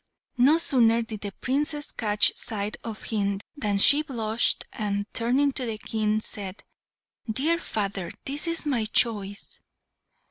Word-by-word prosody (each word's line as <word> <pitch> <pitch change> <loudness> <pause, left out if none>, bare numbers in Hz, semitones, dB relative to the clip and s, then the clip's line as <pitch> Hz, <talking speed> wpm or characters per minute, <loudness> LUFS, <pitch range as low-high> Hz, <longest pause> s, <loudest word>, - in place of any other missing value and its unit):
No 280 +6 +6
sooner 235 -8 +3
did 220 -2 -8
the 205 - -4
Princess 290 +6 -2
catch 210 -2 +3
sight 210 -1 -3
of 225 -2 -7
him 200 -3 -1 0.2
than 210 -8 -1
she 280 +9 +6
blushed, 235 -6 0
and, 205 -2 -2
turning 260 +5 +2
to 255 -2 0
the 220 -1 -3
King, 215 0 -1
said, 200 -3 -7 0.7
"Dear 305 +10 +2
father, 195 - -3
this 290 +5 -1
is 335 -1 +2
my 250 -7 0
choice!" 210 -3 0
225 Hz, 140 wpm, -26 LUFS, 205-270 Hz, 0.7 s, No